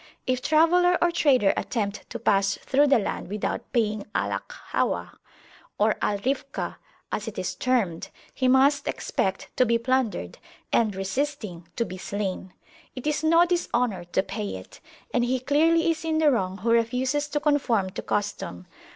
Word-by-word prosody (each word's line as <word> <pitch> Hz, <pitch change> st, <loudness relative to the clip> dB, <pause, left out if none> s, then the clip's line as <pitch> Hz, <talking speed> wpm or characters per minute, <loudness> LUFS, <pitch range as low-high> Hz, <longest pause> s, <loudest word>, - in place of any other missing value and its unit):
If 255 Hz, -1 st, 0 dB
traveller 350 Hz, +5 st, +4 dB
or 345 Hz, -, +3 dB
trader 260 Hz, -11 st, +3 dB
attempt 205 Hz, -3 st, -3 dB
to 235 Hz, -, -5 dB
pass 200 Hz, -3 st, +2 dB
through 285 Hz, +2 st, +2 dB
the 275 Hz, -2 st, +5 dB
land 210 Hz, -, -3 dB
without 210 Hz, +1 st, -3 dB
paying 215 Hz, -3 st, 0 dB
Al -, -, 0 dB
Akhawah -, -, -2 dB, 0.7 s
or 215 Hz, +1 st, +3 dB
Al 205 Hz, -, +1 dB
Rifkah, 275 Hz, +1 st, -2 dB, 0.3 s
as 210 Hz, -, -3 dB
it 225 Hz, -, -6 dB
is 185 Hz, 0 st, -2 dB
termed, 195 Hz, -5 st, 0 dB, 0.2 s
he 260 Hz, -, 0 dB
must 270 Hz, +3 st, +4 dB
expect 190 Hz, 0 st, -2 dB
to -, -, +6 dB
be 235 Hz, -1 st, +2 dB
plundered, 255 Hz, -1 st, -1 dB, 0.3 s
and, 215 Hz, -4 st, +2 dB
resisting, 195 Hz, -, -3 dB
to 235 Hz, -, 0 dB
be 185 Hz, -2 st, -8 dB
slain: 190 Hz, -2 st, -4 dB, 0.4 s
it 255 Hz, -, -7 dB
is 300 Hz, 0 st, 0 dB
no 335 Hz, +2 st, +5 dB
dishonour 245 Hz, -, 0 dB
to 175 Hz, +2 st, 0 dB
pay 100 Hz, -, -4 dB
it, 95 Hz, 0 st, -11 dB, 0.3 s
and 245 Hz, -, +2 dB
he 255 Hz, +2 st, +1 dB
clearly 325 Hz, +5 st, +3 dB
is 320 Hz, 0 st, -4 dB
in 320 Hz, -1 st, 0 dB
the 310 Hz, -2 st, +4 dB
wrong 190 Hz, -6 st, -1 dB
who 225 Hz, +4 st, -1 dB
refuses 255 Hz, +5 st, +1 dB
to 295 Hz, 0 st, -1 dB
conform 270 Hz, -10 st, +1 dB
to 210 Hz, -, -5 dB
custom. 205 Hz, -, -3 dB
240 Hz, 165 wpm, -26 LUFS, 200-290 Hz, 0.7 s, to